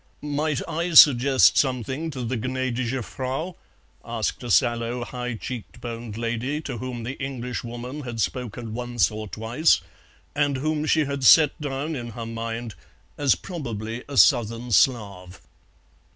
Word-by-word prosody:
"Might 150 Hz, -1 st, -1 dB
I 170 Hz, +1 st, -2 dB
suggest 135 Hz, -2 st, +7 dB
something 130 Hz, +4 st, -1 dB
to 135 Hz, -5 st, -5 dB
the 120 Hz, +2 st, -2 dB
Gnädige 130 Hz, 0 st, -2 dB
Frau?" 135 Hz, -, -4 dB, 0.5 s
asked 115 Hz, -2 st, -3 dB
a 120 Hz, -, -5 dB
sallow 120 Hz, +1 st, +1 dB
high 125 Hz, 0 st, -5 dB
cheek 120 Hz, +1 st, -7 dB
boned 115 Hz, -2 st, -6 dB
lady 120 Hz, +5 st, -2 dB
to 130 Hz, -7 st, -6 dB
whom 125 Hz, -1 st, -5 dB
the 130 Hz, +4 st, -6 dB
Englishwoman 125 Hz, 0 st, -5 dB
had 120 Hz, -4 st, -6 dB
spoken 115 Hz, -1 st, -3 dB
once 120 Hz, -2 st, 0 dB
or 110 Hz, 0 st, -6 dB
twice, 115 Hz, +10 st, +2 dB, 0.5 s
and 145 Hz, -2 st, +1 dB
whom 155 Hz, +2 st, -1 dB
she 155 Hz, 0 st, +3 dB
had 140 Hz, -1 st, -4 dB
set 150 Hz, +4 st, +6 dB
down 145 Hz, +2 st, -3 dB
in 120 Hz, -3 st, -5 dB
her 115 Hz, -, -4 dB
mind 115 Hz, 0 st, -5 dB, 0.4 s
as 140 Hz, -3 st, +3 dB
probably 120 Hz, -, -6 dB
a 140 Hz, -, -5 dB
Southern 120 Hz, -2 st, +4 dB
Slav. 100 Hz, -4 st, +1 dB
125 Hz, 140 wpm, -24 LUFS, 115-140 Hz, 0.5 s, suggest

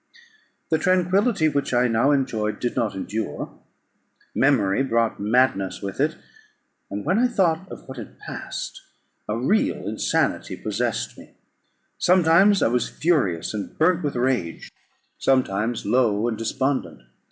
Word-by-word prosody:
The 160 Hz, -, +3 dB
tranquillity 185 Hz, +1 st, +2 dB
which 140 Hz, -4 st, -1 dB
I 125 Hz, +1 st, +4 dB
now 115 Hz, +4 st, +2 dB
enjoyed 120 Hz, -7 st, 0 dB
did 120 Hz, -, -2 dB
not 110 Hz, -4 st, -1 dB
endure. 105 Hz, +3 st, -4 dB, 0.8 s
Memory 125 Hz, -6 st, +2 dB
brought 115 Hz, -4 st, 0 dB
madness 105 Hz, -3 st, +1 dB
with 100 Hz, -1 st, -5 dB
it; -, -, +1 dB, 0.7 s
and 100 Hz, +1 st, -5 dB
when 185 Hz, +8 st, +2 dB
I 250 Hz, -, +4 dB
thought 190 Hz, -5 st, 0 dB
of -, -, -10 dB
what 130 Hz, -, -8 dB
had -, -, -10 dB
passed, -, -, -6 dB, 0.5 s
a 105 Hz, -, 0 dB
real 195 Hz, -, 0 dB
insanity -, -, 0 dB
possessed -, -, -3 dB
me; -, -, -16 dB, 0.6 s
sometimes 185 Hz, +3 st, +5 dB
I -, -, +4 dB
was 120 Hz, +1 st, 0 dB
furious, 130 Hz, -, 0 dB
and 105 Hz, -2 st, -6 dB
burnt 170 Hz, +2 st, +3 dB
with 145 Hz, -, -2 dB
rage; 120 Hz, -9 st, -1 dB, 0.5 s
sometimes 120 Hz, -3 st, +1 dB
low 115 Hz, -3 st, +2 dB
and 115 Hz, -, -1 dB
despondent. 115 Hz, -, -2 dB
130 Hz, 135 wpm, -23 LUFS, 110-160 Hz, 0.8 s, sometimes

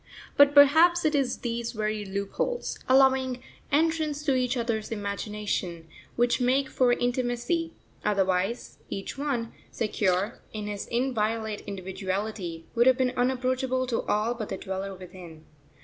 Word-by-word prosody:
But 285 Hz, 0 st, +6 dB
perhaps 320 Hz, +5 st, +6 dB
it 310 Hz, -, +3 dB
is 275 Hz, -4 st, +1 dB
these 235 Hz, -1 st, -3 dB
very 215 Hz, -1 st, -2 dB
loopholes, 200 Hz, -, -3 dB
allowing 260 Hz, -1 st, +4 dB, 0.3 s
entrance 310 Hz, -1 st, +1 dB
to 280 Hz, -, +3 dB
each 255 Hz, 0 st, +1 dB
other's 230 Hz, -2 st, -2 dB
imagination, 200 Hz, -5 st, -3 dB, 0.3 s
which 240 Hz, +1 st, +2 dB
make 265 Hz, +2 st, +2 dB
for 250 Hz, -2 st, +3 dB
intimacy; 245 Hz, +7 st, -1 dB, 0.3 s
otherwise 195 Hz, +2 st, 0 dB
each 195 Hz, -, -5 dB
one, 270 Hz, -5 st, -2 dB, 0.2 s
secure 205 Hz, -1 st, -1 dB
in 210 Hz, -1 st, -4 dB
his 205 Hz, -1 st, -5 dB
inviolate 225 Hz, -3 st, -1 dB
individuality, 190 Hz, -2 st, -4 dB
would 235 Hz, +2 st, +4 dB
have 260 Hz, -1 st, +6 dB
been 255 Hz, -1 st, +2 dB
unapproachable 255 Hz, +1 st, 0 dB
to 245 Hz, -2 st, -1 dB
all 215 Hz, +3 st, +1 dB
but 225 Hz, -3 st, -6 dB
the 195 Hz, -, -3 dB
Dweller 190 Hz, +1 st, -5 dB
within. 175 Hz, -3 st, -12 dB
235 Hz, 135 wpm, -27 LUFS, 200-260 Hz, 0.3 s, But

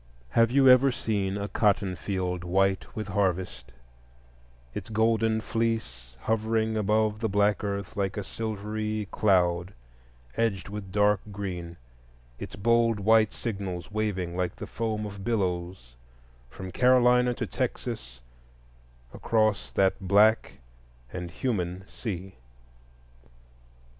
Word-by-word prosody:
Have 115 Hz, -, +4 dB
you 135 Hz, +2 st, +4 dB
ever 130 Hz, +1 st, +7 dB
seen 100 Hz, -5 st, -1 dB
a 100 Hz, 0 st, -3 dB
cotton 100 Hz, -2 st, +1 dB
field 90 Hz, -2 st, -3 dB
white 95 Hz, +2 st, 0 dB
with 105 Hz, -2 st, -4 dB
harvest,—its -, -, -6 dB
golden 110 Hz, 0 st, +2 dB
fleece 90 Hz, -, -3 dB
hovering 110 Hz, 0 st, 0 dB
above 110 Hz, 0 st, +1 dB
the 110 Hz, 0 st, -1 dB
black 105 Hz, +1 st, +2 dB
earth 100 Hz, -2 st, -3 dB
like 100 Hz, +1 st, -2 dB
a 105 Hz, -, -2 dB
silvery 110 Hz, 0 st, -3 dB
cloud 90 Hz, -2 st, +2 dB, 0.6 s
edged 105 Hz, -4 st, -1 dB
with 100 Hz, -2 st, -7 dB
dark 105 Hz, 0 st, +3 dB
green, 90 Hz, -4 st, -5 dB, 0.6 s
its -, -, -7 dB
bold 115 Hz, +1 st, +2 dB
white 110 Hz, +1 st, +4 dB
signals 100 Hz, -5 st, -5 dB
waving 100 Hz, -5 st, -2 dB
like 90 Hz, -1 st, -1 dB
the -, -, -7 dB
foam 110 Hz, -2 st, -3 dB
of 100 Hz, -1 st, -7 dB
billows 90 Hz, -, -2 dB, 0.5 s
from 95 Hz, +8 st, -8 dB
Carolina 125 Hz, 0 st, +4 dB
to -, -, -3 dB
Texas 60 Hz, -1 st, -4 dB, 0.9 s
across 110 Hz, -2 st, +1 dB
that 95 Hz, -1 st, +2 dB
Black 105 Hz, +3 st, +4 dB, 0.6 s
and 90 Hz, -1 st, -5 dB
human 90 Hz, -3 st, -2 dB
Sea? 95 Hz, -4 st, -6 dB
100 Hz, 115 wpm, -27 LUFS, 90-110 Hz, 0.9 s, ever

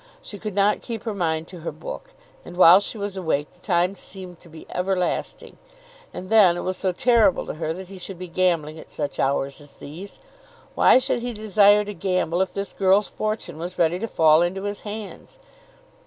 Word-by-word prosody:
She 205 Hz, -, -10 dB
could 210 Hz, -2 st, -6 dB
not 205 Hz, +1 st, +2 dB
keep 230 Hz, -3 st, -6 dB
her 225 Hz, -2 st, -3 dB
mind 165 Hz, -4 st, -1 dB
to 180 Hz, -, -10 dB
her 165 Hz, -, -5 dB
book, -, -, -9 dB, 0.3 s
and 175 Hz, -, -11 dB
while 180 Hz, +1 st, +8 dB
she 205 Hz, -, -5 dB
was 200 Hz, -1 st, -4 dB
awake 160 Hz, -6 st, -2 dB
the -, -, -26 dB
time 180 Hz, 0 st, +1 dB
seemed 185 Hz, -3 st, -10 dB
to 170 Hz, -, -17 dB
be 160 Hz, 0 st, -12 dB
everlasting. 180 Hz, -1 st, -2 dB, 0.5 s
And 185 Hz, +2 st, -8 dB
then 195 Hz, -6 st, +6 dB
it -, -, -3 dB
was 185 Hz, -, -2 dB
so 185 Hz, 0 st, -1 dB
terrible 225 Hz, 0 st, +3 dB
to -, -, -5 dB
her 155 Hz, 0 st, -3 dB
that 185 Hz, +2 st, -9 dB
he 195 Hz, -1 st, -10 dB
should 185 Hz, +1 st, -8 dB
be 180 Hz, +1 st, -7 dB
gambling 165 Hz, -3 st, 0 dB
at -, -, -13 dB
such 145 Hz, -2 st, -5 dB
hours 140 Hz, +1 st, -1 dB
as 145 Hz, -1 st, -17 dB
these! 170 Hz, +10 st, -10 dB, 0.6 s
Why -, -, +6 dB
should 260 Hz, -1 st, 0 dB
he 245 Hz, 0 st, -4 dB
desire 210 Hz, -1 st, +4 dB
to 205 Hz, -, -6 dB
gamble 180 Hz, -1 st, -1 dB
if 190 Hz, -, 0 dB
this 200 Hz, 0 st, -5 dB
girl's 195 Hz, +2 st, +2 dB
fortune 215 Hz, -7 st, -4 dB
was 180 Hz, +2 st, -6 dB
ready 170 Hz, +1 st, +2 dB
to 230 Hz, -, -3 dB
fall 160 Hz, -5 st, +4 dB
into 185 Hz, +3 st, -1 dB
his 205 Hz, 0 st, -4 dB
hands? 215 Hz, -, -9 dB
185 Hz, 205 wpm, -23 LUFS, 170-205 Hz, 0.6 s, while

